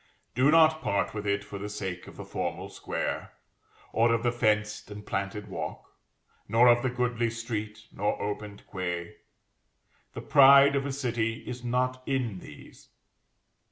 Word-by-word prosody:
Do 130 Hz, +4 st, +3 dB
not 160 Hz, 0 st, +5 dB
part 100 Hz, -8 st, 0 dB
with 105 Hz, -1 st, -4 dB
it 100 Hz, 0 st, 0 dB
for 100 Hz, 0 st, -8 dB
the 105 Hz, +1 st, -5 dB
sake 95 Hz, -3 st, -5 dB
of -, -, -12 dB
the -, -, -7 dB
formal -, -, -4 dB
square, -, -, -4 dB, 0.6 s
or 115 Hz, +1 st, +3 dB
of 115 Hz, 0 st, +1 dB
the 120 Hz, -, +2 dB
fenced 110 Hz, -4 st, 0 dB
and 105 Hz, 0 st, -9 dB
planted 100 Hz, +1 st, -3 dB
walk, 80 Hz, -1 st, -6 dB, 0.5 s
nor 115 Hz, +3 st, +5 dB
of 120 Hz, 0 st, +5 dB
the 130 Hz, -, 0 dB
goodly 120 Hz, -1 st, 0 dB
street 110 Hz, -2 st, -5 dB
nor 105 Hz, +2 st, -1 dB
opened 105 Hz, 0 st, -5 dB
quay. 85 Hz, -2 st, -4 dB, 1.0 s
The -, -, -5 dB
pride 140 Hz, 0 st, +7 dB
of 140 Hz, 0 st, 0 dB
a -, -, -2 dB
city 120 Hz, -4 st, -2 dB
is 125 Hz, 0 st, -6 dB
not 125 Hz, +1 st, 0 dB
in 125 Hz, -8 st, -1 dB
these. 75 Hz, -, -14 dB
115 Hz, 155 wpm, -28 LUFS, 105-125 Hz, 1.0 s, pride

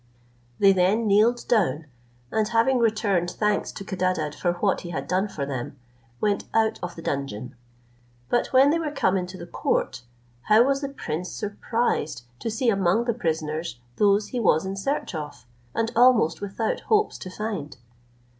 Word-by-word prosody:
They 195 Hz, -1 st, +6 dB
then 190 Hz, +5 st, +2 dB
kneeled 220 Hz, +4 st, +3 dB
down, 165 Hz, -, +1 dB, 0.5 s
and 215 Hz, -1 st, +1 dB
having 235 Hz, +3 st, +2 dB
returned 210 Hz, -6 st, +1 dB
thanks 210 Hz, +3 st, 0 dB
to -, -, -7 dB
Codadad 185 Hz, -6 st, -1 dB
for 175 Hz, +2 st, 0 dB
what 190 Hz, +3 st, 0 dB
he 175 Hz, -, -8 dB
had 175 Hz, -, -4 dB
done 185 Hz, +3 st, +1 dB
for 145 Hz, -8 st, -4 dB
them, 135 Hz, -1 st, -5 dB, 0.4 s
went 205 Hz, -2 st, 0 dB
out 220 Hz, -1 st, +2 dB
of 180 Hz, 0 st, -5 dB
the 165 Hz, -, -9 dB
dungeon; 135 Hz, -4 st, -4 dB, 0.7 s
but 240 Hz, -, +1 dB
when 270 Hz, +2 st, +5 dB
they 335 Hz, -, +1 dB
were 320 Hz, -2 st, -2 dB
come 195 Hz, -10 st, +1 dB
into 185 Hz, 0 st, -3 dB
the 170 Hz, -, -8 dB
court, 175 Hz, -, -1 dB, 0.5 s
how 215 Hz, +2 st, +7 dB
was 275 Hz, +1 st, +1 dB
the 275 Hz, -, -3 dB
prince 180 Hz, -, -4 dB
surprised 210 Hz, -, -2 dB, 0.2 s
to 230 Hz, -, -3 dB
see 230 Hz, +3 st, +1 dB
among 195 Hz, +2 st, +2 dB
the 235 Hz, -, +1 dB
prisoners, 160 Hz, -, -3 dB, 0.2 s
those 205 Hz, 0 st, +3 dB
he 250 Hz, -, -3 dB
was 160 Hz, -7 st, +3 dB
in 190 Hz, +1 st, -3 dB
search 275 Hz, +6 st, -2 dB
of, 150 Hz, -8 st, -7 dB, 0.3 s
and 230 Hz, 0 st, 0 dB
almost 235 Hz, -10 st, +4 dB
without 205 Hz, +2 st, -2 dB
hopes 425 Hz, -1 st, +1 dB
to 185 Hz, -, -7 dB
find! 190 Hz, -7 st, -5 dB
200 Hz, 170 wpm, -25 LUFS, 170-230 Hz, 0.7 s, how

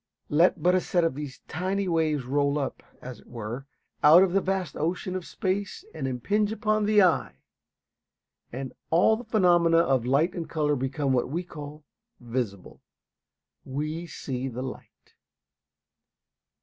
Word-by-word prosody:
Let 165 Hz, +2 st, +3 dB
but 180 Hz, -, +4 dB
a 185 Hz, -, +3 dB
set 175 Hz, -1 st, +1 dB
of 165 Hz, -, +1 dB
these 140 Hz, -1 st, -7 dB
tiny 190 Hz, +4 st, -2 dB
waves 155 Hz, -5 st, +1 dB
roll 140 Hz, +2 st, +1 dB
up, 140 Hz, -3 st, -3 dB, 0.2 s
as 125 Hz, -3 st, -8 dB
it -, -, -20 dB
were, 120 Hz, +3 st, -6 dB, 0.4 s
out 160 Hz, +5 st, +9 dB
of 185 Hz, -2 st, 0 dB
the 195 Hz, -, +3 dB
vast 190 Hz, -1 st, -2 dB
ocean 180 Hz, +3 st, -2 dB
of 185 Hz, -2 st, -5 dB
space 200 Hz, -, -3 dB
and -, -, -3 dB
impinge 205 Hz, -, 0 dB
upon 215 Hz, -1 st, 0 dB
the 210 Hz, -1 st, +5 dB
eye, 180 Hz, -3 st, +2 dB, 1.2 s
and 130 Hz, +1 st, -6 dB, 0.2 s
all 175 Hz, +7 st, +4 dB
the 235 Hz, -, -7 dB
phenomena 175 Hz, -7 st, +4 dB
of 135 Hz, -7 st, +2 dB
light 145 Hz, +7 st, +2 dB
and 170 Hz, -3 st, -5 dB
color 150 Hz, -2 st, +1 dB
become 135 Hz, +1 st, -1 dB
what 125 Hz, -1 st, +1 dB
we 170 Hz, +6 st, -2 dB
call 150 Hz, -3 st, -9 dB, 0.4 s
"visible." 115 Hz, -6 st, -5 dB, 0.8 s
We 155 Hz, +5 st, -4 dB
see 130 Hz, -4 st, -4 dB
the 125 Hz, 0 st, -5 dB
light. 130 Hz, -, -10 dB
155 Hz, 150 wpm, -27 LUFS, 135-185 Hz, 1.2 s, out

